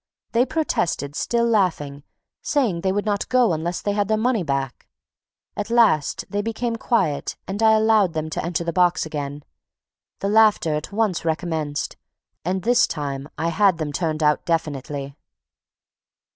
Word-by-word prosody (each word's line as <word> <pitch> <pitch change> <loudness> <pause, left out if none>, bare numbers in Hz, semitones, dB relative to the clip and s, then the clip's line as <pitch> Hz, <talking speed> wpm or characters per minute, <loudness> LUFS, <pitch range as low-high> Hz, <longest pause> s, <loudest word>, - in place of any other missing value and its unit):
They 240 +3 +2
protested, 170 - -1
still 235 +6 0
laughing, 175 -11 0 0.4
saying 230 - 0
they 190 - +1
would 205 +2 -1
not 205 -2 -1
go 250 -7 +3
unless 165 +2 -3
they 205 - 0
had 205 -1 0
their 215 0 +1
money 230 -1 +1
back. 140 -5 -3 0.7
At 205 +1 -4
last, 225 -11 +3
they 205 0 -2
became 230 +2 -2
quiet 195 -11 0
and 200 +3 -4
I 220 0 +6
allowed 215 -5 +3
them 155 -1 -2
to - - -3
enter 170 0 -2
the 170 0 -3
box 180 0 +2
again. 145 -2 -5 0.7
The 195 - -3
laughter 210 -7 +4
at 150 +4 -4
once 205 -4 0
recommenced; 160 -3 -2 0.5
and, 185 +2 -2
this 245 +3 +4
time, 140 -1 -4
I 165 +2 0
had 190 0 +3
them 155 -2 -3
turned 155 0 -1
out 150 0 +2
definitely. 145 -4 -3
180 Hz, 160 wpm, -22 LUFS, 155-215 Hz, 0.7 s, I